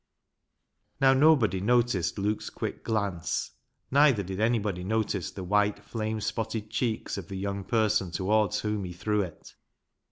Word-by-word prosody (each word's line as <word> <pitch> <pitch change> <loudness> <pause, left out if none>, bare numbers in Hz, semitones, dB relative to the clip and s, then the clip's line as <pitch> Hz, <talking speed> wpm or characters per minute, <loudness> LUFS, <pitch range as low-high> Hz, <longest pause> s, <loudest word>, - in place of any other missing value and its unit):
Now, 135 -1 +6
nobody 130 - +4
noticed 115 -6 +1
Luke's 105 +2 -1
quick - - -5
glance, 100 -7 -1 0.4
neither 140 -6 +5
did 95 +1 -5
anybody 105 -5 0
notice 105 -2 -1
the 95 - -7
white 105 +2 +1
flame 110 -1 -3
spotted 110 -1 -3
cheeks 110 -4 -2
of 95 - -9
the 95 -1 -6
young 100 0 -3
person 105 -4 +1
towards 100 +3 +1
whom 105 -1 -2
he 90 -1 -6
threw 105 +4 0
it. 85 -5 -8
105 Hz, 140 wpm, -28 LUFS, 95-110 Hz, 0.4 s, Now